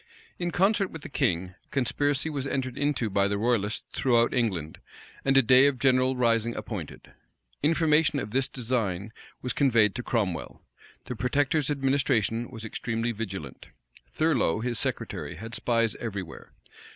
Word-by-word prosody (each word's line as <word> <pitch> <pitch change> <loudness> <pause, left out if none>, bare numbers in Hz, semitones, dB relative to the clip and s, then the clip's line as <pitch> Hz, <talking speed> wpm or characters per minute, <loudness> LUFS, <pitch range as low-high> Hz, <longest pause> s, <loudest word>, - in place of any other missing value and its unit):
In 175 -1 -1
concert 195 +3 +2
with 160 -2 -9
the - - -7
king, 90 -8 0
a - - -24
conspiracy 145 +2 0
was 140 -4 -3
entered 130 -2 -2
into 145 -5 0
by 100 -1 +2
the 100 0 -1
royalists 110 -1 0
throughout 120 -3 +2
England, 95 -11 -1 0.4
and 135 0 +3
a 135 - +7
day 130 +4 +7
of 140 -2 0
general 130 0 +3
rising 115 -2 +1
appointed. 95 -10 -7 0.5
Information 155 0 +3
of 105 - -5
this 130 +2 +1
design 110 -5 -2 0.3
was 125 - -1
conveyed 115 -7 +3
to - - -4
Cromwell. 100 - -2 0.4
The - - -5
protector's 140 +5 +1
administration 135 -5 +1
was 115 -3 -8
extremely 115 +1 -2
vigilant. 95 - -6 0.4
Thurloe, 135 - +1
his 120 -3 -1
secretary, - - -3
had 115 +7 -8
spies 115 -2 +1
every 100 -5 -4
where. 80 - -12
120 Hz, 150 wpm, -27 LUFS, 110-135 Hz, 0.5 s, a